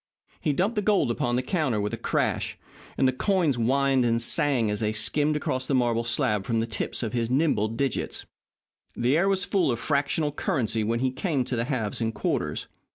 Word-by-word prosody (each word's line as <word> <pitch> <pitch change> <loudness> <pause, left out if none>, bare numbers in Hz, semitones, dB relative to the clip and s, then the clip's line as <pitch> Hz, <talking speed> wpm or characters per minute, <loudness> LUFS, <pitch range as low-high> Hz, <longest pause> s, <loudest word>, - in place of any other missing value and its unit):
He 150 - 0
dumped 190 +10 0
the 210 - 0
gold 205 - +2
upon 120 +1 -1
the 125 - 0
counter 130 - 0
with 105 0 -2
a - - +1
crash, - - -1 0.4
and 130 - +3
the - - +3
coins 170 -1 +1
whined 135 +2 +2
and 115 -1 +2
sang 125 -3 +2
as 105 - -2
they 110 -1 0
skimmed 145 +8 +2
across 130 -3 -2
the 140 - +1
marble 120 -2 +1
slab 105 -3 0
from 115 +2 0
the 115 - 0
tips 115 +2 -3
of 110 - -3
his 115 -2 -1
nimble 130 -6 +2
digits. 120 +4 -2 0.7
The 125 +4 +2
air 185 +5 +3
was 195 0 +1
full 190 -7 +1
of 120 - -1
fractional 145 +4 0
currency 125 - -1
when 115 +2 -1
he 130 -1 +1
came 140 -1 -1
to 125 - -3
the 115 0 -1
halves 120 -6 -2
and 110 -1 -1
quarters. - - -2
130 Hz, 210 wpm, -26 LUFS, 115-150 Hz, 0.7 s, and